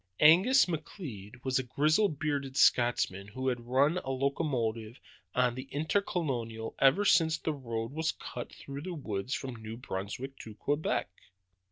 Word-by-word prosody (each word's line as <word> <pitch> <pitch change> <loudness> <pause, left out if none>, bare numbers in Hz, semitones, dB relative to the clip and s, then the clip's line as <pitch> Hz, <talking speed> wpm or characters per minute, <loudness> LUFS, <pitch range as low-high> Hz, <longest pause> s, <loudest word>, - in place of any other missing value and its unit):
Angus 185 - +7
McLeod 135 - -7
was 130 0 +1
a - - -1
grizzle 155 - +3
bearded 145 -3 -2
Scotchman 110 -5 +3
who 130 +5 -2
had 120 -2 -4
run 140 +7 +3
a 135 - -7
locomotive 130 -4 -1 0.4
on 125 -1 +3
the 130 +2 -7
Intercolonial 145 - -1
ever 140 +10 +5
since 160 -4 +4
the 160 - -2
road 115 -4 -4
was 160 +2 0
cut 120 - -7
through 140 0 -8
the 180 +2 -5
woods 115 -4 -3
from 130 -2 -5
New 110 0 -7
Brunswick 120 +5 -5
to 110 -2 -9
Quebec. 145 +7 0
135 Hz, 150 wpm, -31 LUFS, 115-155 Hz, 0.4 s, Angus